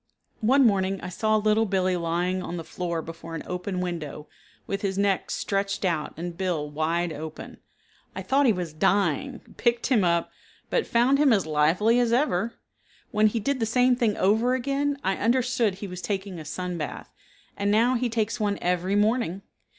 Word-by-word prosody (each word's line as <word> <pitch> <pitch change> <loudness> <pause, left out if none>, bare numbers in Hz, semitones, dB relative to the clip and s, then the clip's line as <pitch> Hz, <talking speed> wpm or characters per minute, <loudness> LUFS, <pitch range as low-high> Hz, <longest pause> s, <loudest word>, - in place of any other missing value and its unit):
One 260 +4 +4
morning 195 -3 +2
I 180 - -5
saw 215 +4 +1
Little 215 +1 +2
Billee 185 -1 +1
lying 175 +2 -1
on 175 -1 -5
the 165 - -5
floor 170 -1 -4
before 165 0 -8
an 165 - -5
open 180 +1 -3
window 155 -4 -5 0.4
with 195 - -3
his 195 -1 -2
neck 200 -1 +1
stretched 195 0 -1
out 165 -4 -1
and 170 +1 -5
bill 170 -5 -1
wide 165 +3 -1
opened. 155 +1 -8 0.6
I - - -5
thought 275 +1 +3
he - - +6
was 180 -5 -3
dying, 200 - +1 0.2
picked 235 -1 +1
him 215 -5 +4
up, 170 -1 +1 0.4
but 480 - +1
found 250 +4 +3
him 290 -3 +5
as 200 -6 +3
lively 160 +10 +3
as 240 -2 +2
ever. 235 -4 +1 0.6
When 215 0 +4
he 225 +2 -1
did 270 +5 -1
the 225 - 0
same 250 +2 +3
thing 230 -4 0
over 220 +6 +3
again 280 +2 -1
I 190 0 0
understood 240 -2 +1
he 200 +1 -7
was 180 -1 -7
taking 195 -3 -3
a 155 - -9
sun 180 +2 -4
bath, 150 - -6 0.4
and 200 0 -1
now 230 +4 +4
he 250 -1 0
takes 230 +1 -1
one 205 -2 0
every 180 +2 0
morning. 210 -3 +1
200 Hz, 185 wpm, -26 LUFS, 175-235 Hz, 0.6 s, he